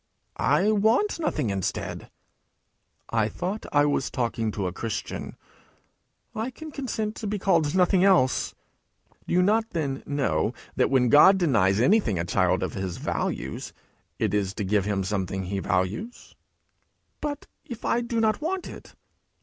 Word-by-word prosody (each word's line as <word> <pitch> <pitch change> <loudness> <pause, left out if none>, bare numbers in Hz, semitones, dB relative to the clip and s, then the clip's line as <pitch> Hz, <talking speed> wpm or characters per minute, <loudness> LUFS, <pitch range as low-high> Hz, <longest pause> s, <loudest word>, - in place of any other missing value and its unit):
'I 150 - +3
want 220 - +2
nothing 295 - -1
instead.' 95 -2 -3 1.0
'I 110 -2 +1
thought 190 - -4
I 145 0 +4
was 145 -2 0
talking 115 -2 -1
to 100 -2 -3
a 90 - -1
Christian!' 115 +2 -5 1.0
'I 225 +3 -3
can 310 +4 -10
consent 220 -6 -3
to 220 - -4
be 210 +1 -1
called 165 -5 +2
nothing 185 0 +4
else.' 180 -10 +3 0.7
'Do - - 0
you 180 - +5
not, 220 +3 +2
then, 140 -7 -2
know 135 - 0 0.2
that, - - +2
when 130 -2 +3
God 190 - +7
denies 110 - +2
anything 125 - +3
a 85 - -1
child 90 +1 +1
of 95 - -3
his 95 -3 -4
values, - - -3 0.4
it - - 0
is 100 -2 0
to 105 - -3
give 100 0 +1
him 100 -2 0
something 95 -1 -2
he 95 +2 -3
values?' 95 - -2 0.9
'But 295 -1 -4 0.2
if 240 -2 -8
I 240 - +2
do 235 -1 -2
not 220 +1 +1
want 365 +4 -2
it?' - - -11
145 Hz, 155 wpm, -26 LUFS, -, 1.0 s, God